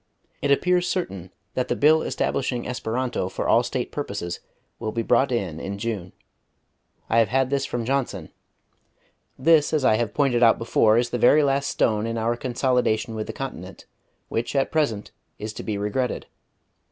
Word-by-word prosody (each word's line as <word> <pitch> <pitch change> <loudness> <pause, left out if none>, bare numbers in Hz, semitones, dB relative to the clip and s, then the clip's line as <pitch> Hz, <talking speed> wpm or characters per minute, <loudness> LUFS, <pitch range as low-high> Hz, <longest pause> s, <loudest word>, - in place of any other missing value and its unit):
It 145 - 0
appears 180 +5 +3
certain 95 - -3 0.2
that 125 - -1
the - - 0
Bill 155 +2 +5
establishing 125 -3 -2
Esperanto 125 -4 -2
for - - -3
all - - +5
State - - -3
purposes 85 0 -4 0.4
will 110 - -3
be 115 0 -2
brought 135 +4 +3
in 95 -10 -2
in 100 +3 -5
June. 100 -5 -4 1.0
I 115 - +3
have 115 - +4
had 130 +4 +1
this 140 -1 0
from 120 -2 -3
Johnson. 125 - -2 1.1
This, 155 +2 +4
as 150 -4 +2
I 110 - +4
have 115 -3 -2
pointed 135 -5 +2
out 115 -1 +6
before, 115 -1 +3
is 120 0 +1
the 120 - -1
very 150 +5 +5
last 140 0 +1
stone 110 -1 +1
in 115 0 -3
our 115 +1 0
consolidation 120 -3 0
with 110 -1 -4
the - - -3
continent, 95 - -7 0.4
which, 115 +4 -3
at 135 - +1
present, 140 -10 -1 0.3
is 110 0 -6
to - - -7
be 105 -2 -3
regretted.... 105 +5 -2
120 Hz, 175 wpm, -24 LUFS, 110-135 Hz, 1.1 s, out